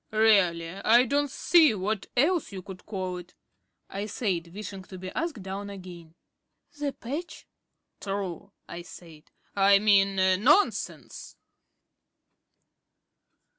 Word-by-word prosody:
"Really, 200 -7 +3
I 220 +6 +4
don't 285 +3 0
see 310 -2 +4
what 200 +1 -3
else 320 +3 +2
you 190 -2 -7
could 185 -1 -11
call 185 -3 -4
it," 180 0 -12 0.5
I 200 +2 -5
said, 180 -7 -2
wishing 200 0 -7
to 185 - -10
be 185 0 -7
asked 315 - -4
down 195 +2 -6
again. 175 -4 -11 0.6
"The 290 -1 -1
patch." 285 +7 -7 0.5
"True," 195 -1 -5 0.2
I 170 - -7
said. 165 -3 -14 0.3
"I 200 0 +6
mean, 200 -1 +4 0.3
Nonsense." 305 - +1
200 Hz, 115 wpm, -27 LUFS, 185-230 Hz, 0.6 s, I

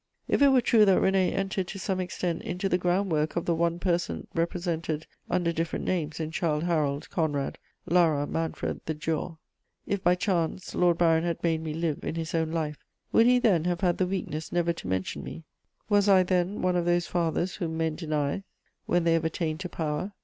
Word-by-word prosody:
If - - +1
it 285 - +8
were 265 -2 +5
true 225 -2 +5
that 195 -2 +5
René 190 -1 +3
entered 195 -1 -1
to 195 - -6
some 190 -1 -2
extent 180 -2 -2
into 180 +3 -2
the 180 -1 +1
groundwork 175 -4 +1
of 170 - -1
the 170 - +2
one 170 +1 +1
person 175 -1 -1
represented 165 -2 -2 0.2
under 175 -2 +1
different 165 0 -2
names 160 -4 -1
in 160 -1 -3
Childe 155 -2 0
Harold, 150 -4 0
Conrad, 145 -5 -1 0.3
Lara, 160 -4 +3
Manfred, 165 +2 -3
the 160 - -1
Giaour; 160 +2 -3 0.5
if, 200 -1 -2
by 175 +1 +4
chance, 180 -2 -1
Lord 175 -2 +3
Byron 165 -1 +3
had 170 -1 -2
made 165 -2 +1
me 155 -1 -4
live 165 -2 -2
in - - -3
his 165 -1 -4
own 160 -1 0
life, 155 -2 -3 0.3
would 230 - +5
he 250 0 +6
then 200 -10 +3
have 175 0 -1
had 175 -3 +1
the 185 - +2
weakness 175 -5 -4
never 170 -1 +1
to 165 - -9
mention 95 0 -2
me? 165 - -8 0.4
Was 205 -1 +3
I 190 -2 +6
then 180 +2 0
one 180 0 +2
of 175 -1 +1
those 175 0 +2
fathers 175 +1 -1
whom 165 -4 -3
men 160 -1 0
deny 155 0 -2 0.5
when 175 0 +2
they 165 0 +3
have 165 0 +2
attained 160 -1 -2
to 180 -1 -5
power? 160 +5 -3
170 Hz, 205 wpm, -27 LUFS, 160-180 Hz, 0.5 s, it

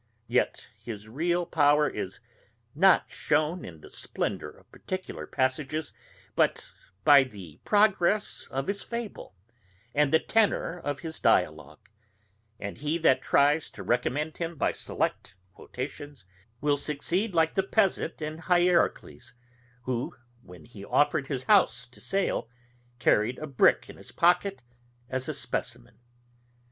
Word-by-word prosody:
Yet - - 0
his 110 -2 -8
real 170 +9 0
power 150 -2 +3
is 95 +6 -5 0.5
not 185 +4 +4
shewn 155 +4 0
in 80 -3 -10
the - - -14
splendour - - -3
of - - -20
particular 185 0 -6
passages, 140 +3 -1 0.4
but - - +1 0.4
by 145 -2 +8
the 95 - -11
progress 210 -1 +2
of 135 +1 -3
his 200 +3 -2
fable, 235 - -6 0.6
and 145 -1 +2
the 160 - +6
tenour 200 -4 +1
of 145 -1 -3
his 160 -1 -7
dialogue; - - +1 0.7
and 100 -1 -6
he 150 +3 -1
that 130 -6 +3
tries 145 +4 +3
to - - -10
recommend 145 +6 -1
him 170 0 -4
by - - +1
select 100 - -3 0.2
quotations, 140 -1 -8 0.4
will 145 0 +2
succeed 175 +8 -1
like 160 -1 +3
the 190 - +2
pedant 190 -5 0
in 155 +1 -5
Hierocles, 175 -8 +1 0.5
who, 125 -1 -3 0.3
when 90 -5 -14
he 110 -4 -12
offered 145 +4 +2
his 135 -3 -3
house 130 - +3
to 120 0 -17
sale, 195 -11 -1 0.5
carried 120 0 +2
a 155 - -5
brick 140 -4 +3
in - - -12
his - - -11
pocket 180 0 +2 0.5
as 130 0 -2
a - - -1
specimen. - - -4
150 Hz, 135 wpm, -28 LUFS, 130-175 Hz, 0.7 s, by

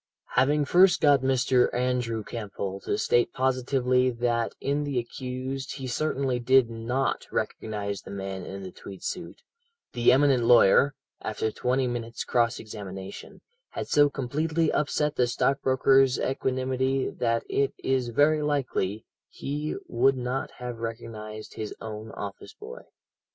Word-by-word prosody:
"Having 145 +4 +3
first 180 +4 +5
got 145 -3 +5
Mr. 130 -1 +3
Andrew 125 -3 0
Campbell 100 -3 -5
to 205 - 0
state 120 - +2
positively 130 0 +2
that 120 -1 -1
in 145 +1 -1
the 140 -3 -2
accused 130 +2 -4
he 135 -2 -6
certainly 130 -1 -1
did 125 -1 +4
not 120 +4 -2
recognize 100 -3 -3
the - - -12
man 95 -1 -5
in 95 0 -7
the 95 - -7
tweed 95 0 -11
suit, 180 - -5 0.5
the 120 -1 +4
eminent 135 -2 +4
lawyer, 120 +4 +6 0.3
after 110 0 -2
twenty 130 +4 0
minutes' 120 -1 -4
cross 120 -1 +1
examination, 100 -3 -8 0.3
had - - -5
so 145 0 +5
completely 155 +5 0
upset 150 0 0
the 125 - +3
stockbroker's 135 +1 +3
equanimity 130 0 0
that 115 -1 -1
it 140 0 +1
is 130 -2 0
very 150 +5 +3
likely 130 -8 -1 0.2
he 150 +2 -4
would 130 +3 +3
not 125 +1 -2
have 125 -2 -6
recognized 110 -2 -7
his 110 -1 -5
own 110 0 -7
office 100 -1 -7
boy. 460 +4 -10
125 Hz, 135 wpm, -27 LUFS, 115-135 Hz, 0.5 s, lawyer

